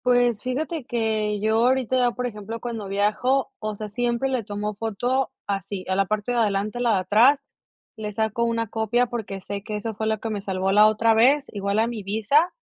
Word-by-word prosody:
Pues 245 -3 +3
fíjate, 290 +4 -3
que 220 -3 -1
yo 220 +1 +2
ahorita, 255 -1 +2
por 250 +2 -3
ejemplo, 220 -1 -5
cuando 225 -4 -5
viajo, 210 +7 +1
o 215 -1 -3
sea, 215 +1 -6
siempre 240 +4 -1
le 255 -3 -1
tomo 205 +1 -4
foto, 235 +5 -1 0.2
así, 200 -2 -4
a 185 - 0
la 195 +1 +2
parte 215 +3 -1
de 240 - +1
adelante, 210 +1 0
la 240 -2 +2
de - - +2
atrás, 235 +9 +4 0.5
le 210 -1 -4
saco 220 +2 -1
una 230 -1 0
copia, 220 +3 +1
porque 225 -5 -5
sé 200 +1 -5
que 210 +1 -5
eso 220 +2 -3
fue 220 +1 -3
lo 220 -1 0
que 225 - -4
me 205 -2 -3
salvó, 190 -1 -1
la 210 +2 +7
otra 225 +1 +3
vez. 265 +6 +4
Igual 200 0 -1
a 220 - +4
mi 235 -2 -4
visa, 220 - +2
220 Hz, 210 wpm, -24 LUFS, 205-245 Hz, 0.5 s, la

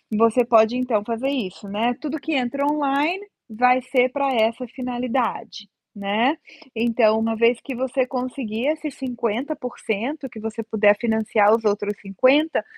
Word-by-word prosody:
você 230 +2 +4
pode, 225 0 +4
então, 245 -5 0
fazer 235 +4 -2
isso, 205 -7 -4
né, 225 +5 0
tudo 310 0 -4
que 320 +2 -3
entra 280 +1 0
online 295 +6 0 0.2
vai 250 +3 +3
ser 255 0 +2
pra 275 0 0
essa 230 +3 +1
finalidade, 245 -3 -3 0.3
né. 215 +9 0 0.4
Então 225 -1 +3
uma 225 0 0
vez 235 +1 +3
que 265 - -6
você 260 +1 0
conseguir 250 -1 -4
esses 305 -2 -2
50% 250 +1 -3
que 225 - -11
você 225 +1 -5
puder 210 -1 +3
financiar 220 -2 +2
os 225 -1 -5
outros 205 0 0
50, 255 - +2
240 Hz, 145 wpm, -22 LUFS, 220-270 Hz, 0.4 s, você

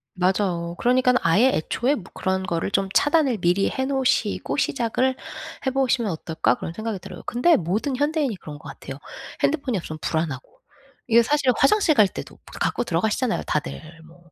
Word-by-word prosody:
맞아요. 180 -2 0
그러니깐 250 +1 +3
'아예 200 +10 +4
애초에 240 - 0
뭐 200 - -8
그런 190 0 -1
거를 175 0 -2
좀 195 0 +1
차단을 290 -5 +3
미리 180 +1 +2
해 265 - -2
놓으시고 265 -6 0
시작을 260 -1 0 0.5
해 265 - +2
보시면 250 -5 +1
어떨까?' 160 0 0
그런 165 - -6
생각이 220 +1 -4
들어요. - - -10
근데 250 +8 +3
모든 210 - -1
현대인이 290 -3 0
그런 150 -4 -9
것 145 - -13
같아요. 135 - -8 0.5
핸드폰이 280 -6 +1
없으면 155 -3 -6
불안하고 160 - -3 0.5
이게 235 0 +6
사실 285 0 +2
화장실 335 +3 +4
갈 210 -5 +6
때도 - - -8
뭐 - - -26 0.2
갖고 - - 0
들어가시잖아요 220 +6 0
다들 150 - -2 0.3
뭐. 170 0 -20
220 Hz, 395 characters per minute, -23 LUFS, 175-265 Hz, 0.5 s, 이게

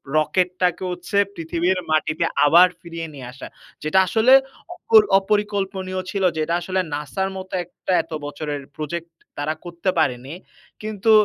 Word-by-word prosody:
rocket 180 +4 +2
টাকে 180 +1 +1
হচ্ছে 180 +3 -3 0.2
পৃথিবীর 170 +3 0
মাটিতে 155 +1 +1 0.2
আবার 175 +5 +7
ফিরিয়ে 165 -2 -6
নিয়ে 130 -3 -8
আসা 130 - -9 0.4
যেটা 155 +5 +3
আসলে 230 +7 +4 0.4
অ 445 +4 +3 0.2
অপরিকল্পনীয় 195 -2 -1
ছিল। 195 -2 -2
যেটা 155 +2 0
আসলে 185 +2 -1
NASA-র 150 +7 -2
মত 190 0 -7
একটা 180 +2 -6
এত - - -25
বছরের 145 -1 -4
project 170 +2 -4 0.3
তারা 150 +2 -1
করতে 175 +2 -3
পারেনি। 130 0 -1 0.5
কিন্তু 215 0 0
175 Hz, 140 wpm, -22 LUFS, 155-190 Hz, 0.5 s, আবার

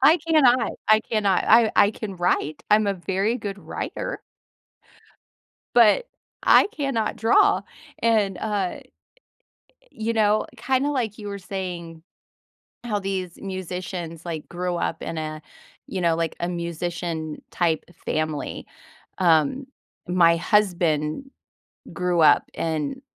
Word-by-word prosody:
I 305 +5 +7
cannot, 255 -7 +4 0.2
I 215 0 +6
cannot, 205 -4 +1
I 225 -1 +6
I 205 - +6
can 205 -3 -7
write, 165 -4 0
I'm 210 0 +5
a 200 - +1
very 195 +5 -1
good 205 -4 -6
writer. - - -5 1.5
But, 240 - +5 0.4
I - - +7
cannot 275 -7 -1
draw, 405 - +4 0.4
and, 215 -4 +2
uh 205 -4 -2 1.2
you 220 +1 -1
know, 215 -1 +2
kinda 265 +2 0
like 240 -7 -2
you 205 -1 -7
were 200 - -5
saying 180 -4 -6 0.8
how 225 -4 -1
these 190 -3 -4
musicians, 180 -3 -6
like, 160 -3 -5
grew 180 0 -3
up 165 -1 -2
in 165 - -5
a, 155 -1 -4 0.5
you 190 - -4
know, 170 -2 +2
like, 165 -1 -1
a 175 - -1
musician-type 170 -1 -3 0.2
family, 155 -1 -3 0.5
um, 170 - +3 0.4
my 175 -2 +5
husband 175 - +1 0.6
grew 180 -2 0
up, 150 -2 +5
and, 160 - -3
190 Hz, 120 wpm, -24 LUFS, 170-220 Hz, 1.5 s, I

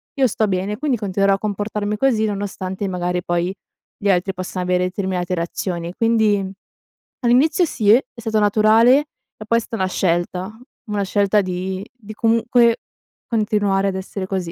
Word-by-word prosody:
io 270 -3 +3
sto 215 -1 0
bene, 195 +2 -2
quindi 270 -2 0
continuerò 195 -1 +1
a - - -7
comportarmi 210 0 -2
così 230 -3 +2
nonostante 200 -2 -4
magari 180 -1 -2
poi 175 +2 -1 0.4
gli 200 - -1
altri 185 +1 +1
possa 185 0 -5
avere 180 0 +1
determinate 185 -1 -2
reazioni. 170 0 -3
Quindi 220 -3 +2 0.8
all'inizio 265 +9 +3
sì, 220 -9 -1
è 240 +5 +6
stato 225 -2 -1
naturale 215 +5 +5
e 260 -6 -12
poi 230 - +3
è - - -5
sta 225 - -6
una 190 -2 0
scelta, 180 +3 -1 0.3
una 205 -1 0
scelta 205 +1 +2
di 185 +1 -4
di 215 -4 -11
comunque 230 +1 +3 0.5
continuare 205 -3 +1
ad 190 - -4
essere 190 0 -5
così. 185 -3 -3
205 Hz, 155 wpm, -20 LUFS, 185-225 Hz, 0.8 s, è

